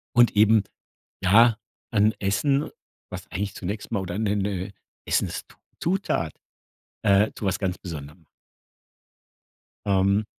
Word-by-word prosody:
und 120 Hz, -2 st, +5 dB
eben 105 Hz, 0 st, +5 dB, 0.6 s
ja, 110 Hz, +4 st, +6 dB, 0.3 s
dann 110 Hz, 0 st, +3 dB
Essen, 135 Hz, +9 st, +1 dB, 0.4 s
was -, -, -7 dB
eigentlich 100 Hz, +2 st, -3 dB
zunächst 100 Hz, +5 st, -5 dB
mal 110 Hz, -, 0 dB
oder 90 Hz, 0 st, -4 dB
'ne 105 Hz, -1 st, 0 dB
'ne 100 Hz, -1 st, -2 dB, 0.3 s
Essenszutat, 170 Hz, -, -2 dB, 0.7 s
äh, 100 Hz, +2 st, +4 dB
zu -, -, -7 dB
was 95 Hz, -2 st, 0 dB
ganz 95 Hz, -2 st, -2 dB
Besonderem. 80 Hz, -2 st, -9 dB, 1.6 s
Ähm. 100 Hz, +1 st, +2 dB
100 Hz, 110 wpm, -25 LUFS, 95-110 Hz, 1.6 s, ja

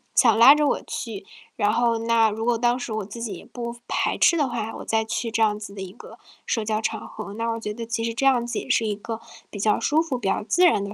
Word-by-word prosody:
想 230 Hz, -4 st, +5 dB
拉 265 Hz, +5 st, +9 dB
着 300 Hz, -1 st, +2 dB
我 -, -, 0 dB
去， 215 Hz, -5 st, -6 dB, 0.3 s
然 205 Hz, -1 st, +2 dB
后 235 Hz, 0 st, +2 dB
那 230 Hz, -1 st, +3 dB
如 220 Hz, +2 st, -4 dB
果 240 Hz, -1 st, +2 dB
当 240 Hz, +1 st, +2 dB
时 245 Hz, -, -5 dB
我 215 Hz, -2 st, -3 dB
自 220 Hz, +4 st, -9 dB
己 225 Hz, -4 st, -3 dB
也 -, -, -12 dB
不 235 Hz, -1 st, -6 dB
排 -, -, 0 dB
斥 -, -, +5 dB
的 290 Hz, -, +2 dB
话， 225 Hz, -2 st, -3 dB
我 -, -, -9 dB
再 220 Hz, 0 st, +1 dB
去 230 Hz, +1 st, -2 dB
这 225 Hz, -, 0 dB
样 210 Hz, -1 st, +2 dB
子 205 Hz, -2 st, -8 dB
的 195 Hz, -, -7 dB
一 185 Hz, -, -7 dB
个 -, -, -13 dB, 0.3 s
社 225 Hz, -3 st, -1 dB
交 215 Hz, 0 st, -1 dB
场 -, -, -3 dB
合， 215 Hz, -2 st, -8 dB
那 230 Hz, +2 st, -2 dB
我 230 Hz, -, -3 dB
觉 210 Hz, -1 st, -4 dB
得 230 Hz, +1 st, -6 dB
其 230 Hz, 0 st, -2 dB
实 230 Hz, -, -1 dB
这 255 Hz, +4 st, -1 dB
样 250 Hz, -3 st, +4 dB
子 240 Hz, -, -4 dB
也 -, -, -9 dB
是 230 Hz, -3 st, +2 dB
一 205 Hz, -, -1 dB
个 225 Hz, +2 st, -6 dB, 0.3 s
比 205 Hz, -, -8 dB
较 210 Hz, +1 st, +2 dB
舒 310 Hz, +2 st, +2 dB
服， 280 Hz, -6 st, -2 dB
比 235 Hz, -, -4 dB
较 200 Hz, -, 0 dB
自 355 Hz, -, +4 dB
然 205 Hz, -, +4 dB
的 200 Hz, +1 st, -6 dB
225 Hz, 305 characters per minute, -24 LUFS, 215-240 Hz, 0.3 s, 拉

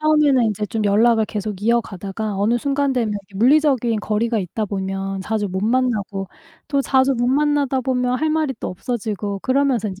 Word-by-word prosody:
처음에는 300 Hz, -5 st, +4 dB
인제 210 Hz, -1 st, -1 dB
좀 220 Hz, -1 st, -2 dB
연락을 220 Hz, +2 st, +4 dB
계속 210 Hz, -2 st, -4 dB
이어가다가 215 Hz, -2 st, -1 dB
어느 215 Hz, +5 st, +1 dB
순간 280 Hz, +1 st, 0 dB
되면 235 Hz, -4 st, 0 dB
이렇게 200 Hz, -1 st, -8 dB
물리적인 250 Hz, -2 st, +3 dB
거리가 220 Hz, +2 st, 0 dB
있다 205 Hz, +4 st, -3 dB
보면 195 Hz, -1 st, -3 dB
자주 210 Hz, +1 st, -2 dB
못 190 Hz, +2 st, -3 dB
만나고 215 Hz, -5 st, 0 dB, 0.4 s
또 280 Hz, -1 st, +1 dB
자주 265 Hz, 0 st, +2 dB
못 245 Hz, 0 st, 0 dB
만나다 285 Hz, -1 st, +1 dB
보면 250 Hz, -1 st, 0 dB
할 315 Hz, +1 st, 0 dB
말이 310 Hz, -4 st, 0 dB
또 -, -, -4 dB
없어지고 205 Hz, -1 st, -4 dB
그러면서 260 Hz, -5 st, +1 dB
인제 190 Hz, 0 st, -8 dB
230 Hz, 395 characters per minute, -20 LUFS, 205-265 Hz, 0.4 s, 처음에는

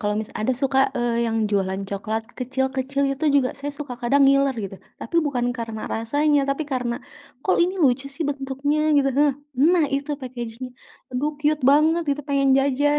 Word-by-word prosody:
kalau 210 Hz, 0 st, 0 dB
misa 220 Hz, -, -6 dB
ada 220 Hz, -, +1 dB
suka, 265 Hz, 0 st, +2 dB, 0.2 s
e -, -, 0 dB, 0.3 s
yang 225 Hz, 0 st, -1 dB
jualan 195 Hz, -1 st, 0 dB
coklat 215 Hz, +3 st, -2 dB, 0.2 s
kecil-kecil, 265 Hz, +2 st, -1 dB
itu 275 Hz, +3 st, -5 dB
juga 255 Hz, -2 st, +3 dB
saya 285 Hz, +1 st, -4 dB
suka 285 Hz, -4 st, -5 dB
kadang 275 Hz, +4 st, +3 dB
ngiler, 275 Hz, 0 st, +3 dB
gitu. 195 Hz, 0 st, -7 dB, 0.2 s
Tapi 335 Hz, -, -4 dB
bukan 245 Hz, -4 st, -1 dB
karena 225 Hz, -1 st, -5 dB
rasanya, 290 Hz, +6 st, +2 dB
tapi 275 Hz, +3 st, -1 dB
karena, 250 Hz, -2 st, -1 dB, 0.5 s
"Kok 375 Hz, -, +3 dB
ini 365 Hz, +2 st, 0 dB
lucu 265 Hz, 0 st, +2 dB
sih 315 Hz, +3 st, -4 dB
bentuknya?" 275 Hz, +1 st, -1 dB, 0.2 s
gitu 275 Hz, -1 st, +3 dB
nah. 290 Hz, -1 st, +4 dB, 0.2 s
"Nah, 320 Hz, +6 st, +4 dB
itu 280 Hz, +2 st, -3 dB
packaging 240 Hz, -2 st, -7 dB
nya -, -, -11 dB, 0.4 s
aduh 285 Hz, +4 st, 0 dB
cute 300 Hz, -1 st, +1 dB
banget," 315 Hz, +4 st, +4 dB
gitu. 285 Hz, +1 st, -1 dB
"pengen 275 Hz, -1 st, +2 dB
jajan," 285 Hz, +2 st, +2 dB
275 Hz, 180 wpm, -23 LUFS, 245-290 Hz, 0.5 s, nah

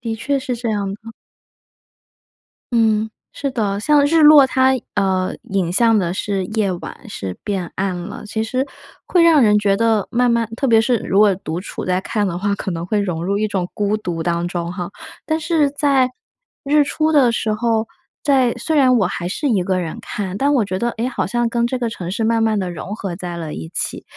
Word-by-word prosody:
的 230 Hz, -2 st, -3 dB
确 275 Hz, +5 st, -1 dB
是 255 Hz, -2 st, -3 dB
这 235 Hz, -1 st, -3 dB
样 205 Hz, -2 st, -1 dB
的。 225 Hz, +2 st, -12 dB, 1.6 s
嗯， 220 Hz, -2 st, +2 dB, 0.2 s
是 280 Hz, -, -3 dB
的， 205 Hz, -5 st, -1 dB
像 290 Hz, +4 st, +4 dB
日 320 Hz, +2 st, +3 dB
落 295 Hz, -2 st, +9 dB
它， 260 Hz, 0 st, +3 dB, 0.2 s
呃， 190 Hz, -2 st, +1 dB
引 190 Hz, -3 st, -1 dB
向 225 Hz, +3 st, +4 dB
的 175 Hz, -3 st, 0 dB
是 195 Hz, 0 st, -2 dB
夜 215 Hz, -2 st, 0 dB
晚， 175 Hz, -, -9 dB
是 95 Hz, -, -6 dB
变 190 Hz, -4 st, -3 dB
暗 190 Hz, -1 st, -1 dB
了。 180 Hz, +4 st, -7 dB
其 220 Hz, +1 st, -2 dB
实 255 Hz, +4 st, -2 dB, 0.4 s
会 350 Hz, -2 st, +3 dB
让 320 Hz, -4 st, +6 dB
人 210 Hz, -2 st, +5 dB
觉 200 Hz, -1 st, +2 dB
得 225 Hz, -3 st, +2 dB
慢 245 Hz, +1 st, +2 dB
慢 230 Hz, -2 st, +1 dB
特 270 Hz, -, 0 dB
别 225 Hz, -1 st, +5 dB
是 240 Hz, +1 st, +2 dB
如 195 Hz, -, -2 dB
果 210 Hz, -1 st, +6 dB
独 175 Hz, -2 st, -5 dB
处 -, -, -6 dB
在 185 Hz, 0 st, 0 dB
看 205 Hz, +1 st, -1 dB
的 175 Hz, -1 st, -3 dB
话， 200 Hz, +2 st, 0 dB
可 195 Hz, -, -4 dB
能 170 Hz, -1 st, -4 dB
会 210 Hz, +3 st, 0 dB
融 175 Hz, -4 st, -2 dB
入 200 Hz, +2 st, 0 dB
一 215 Hz, +1 st, 0 dB
种 185 Hz, -3 st, -2 dB
孤 205 Hz, 0 st, 0 dB
独 175 Hz, -6 st, -4 dB
当 170 Hz, 0 st, -1 dB
中 175 Hz, 0 st, -3 dB
哈。 175 Hz, -2 st, -5 dB, 0.4 s
但 315 Hz, 0 st, 0 dB
是 315 Hz, -2 st, +2 dB
在 280 Hz, -3 st, +2 dB, 0.6 s
日 295 Hz, +1 st, +4 dB
出 310 Hz, +2 st, 0 dB
的 260 Hz, -5 st, +5 dB
时 220 Hz, -2 st, -1 dB
候， 225 Hz, 0 st, 0 dB, 0.3 s
在 265 Hz, -4 st, +3 dB
虽 320 Hz, -, -2 dB
然 255 Hz, -4 st, +5 dB
我 195 Hz, -, +2 dB
还 175 Hz, -1 st, -3 dB
是 290 Hz, +9 st, -2 dB
1 205 Hz, -7 st, +2 dB
个 185 Hz, 0 st, 0 dB
人 165 Hz, -3 st, -4 dB
看， 195 Hz, -2 st, -4 dB
但 285 Hz, +2 st, +2 dB
我 240 Hz, -6 st, +2 dB
觉 185 Hz, -1 st, -3 dB
得， 235 Hz, +5 st, 0 dB
哎， 235 Hz, -, -1 dB
好 255 Hz, -, -2 dB
像 240 Hz, -1 st, 0 dB
跟 235 Hz, 0 st, 0 dB
这 250 Hz, +1 st, -2 dB
个 235 Hz, -, -1 dB
城 180 Hz, -5 st, -6 dB
市 220 Hz, +3 st, -1 dB
慢 225 Hz, 0 st, +2 dB
慢 220 Hz, -2 st, +1 dB
地 185 Hz, -2 st, -2 dB
融 180 Hz, +3 st, -6 dB
合 190 Hz, -4 st, -4 dB
在 175 Hz, -1 st, -6 dB
了 160 Hz, -2 st, -5 dB
一 80 Hz, 0 st, -7 dB
起， -, -, -3 dB
215 Hz, 235 characters per minute, -19 LUFS, 190-250 Hz, 1.6 s, 落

